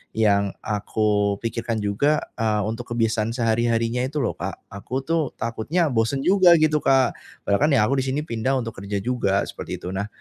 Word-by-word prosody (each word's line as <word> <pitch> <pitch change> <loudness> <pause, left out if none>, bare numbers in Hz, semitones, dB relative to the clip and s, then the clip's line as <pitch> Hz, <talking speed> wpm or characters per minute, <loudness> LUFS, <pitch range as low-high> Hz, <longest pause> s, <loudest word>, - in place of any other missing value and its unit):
yang 100 -2 +2
aku 105 -1 0
pikirkan 115 0 -2
juga, 140 +10 +1 0.2
eee, 110 -2 +1
untuk 115 +2 -5
kebiasaan 115 0 0
sehari-harinya 115 0 +1
itu, 150 +3 -3
loh, - - 0
Kak. - - -6
Aku, 125 +7 -4
tuh, 160 -1 -1
takutnya 135 +8 -1
bosan 120 +4 0
juga, 185 -2 +6
gitu, 155 -1 +3
Kak. 130 -2 +3 0.3
Padahal, 100 - +1
kan, - - +1
ya, 105 - +4
aku 135 +2 +1
di 130 - -1
sini 135 +3 -1
pindah 130 0 -1
untuk 115 -3 -5
kerja 100 +1 -3
juga, 115 -6 +1
seperti - - -6
itu. - - -7
Nah, 100 +2 -3
115 Hz, 180 wpm, -23 LUFS, 105-135 Hz, 0.3 s, juga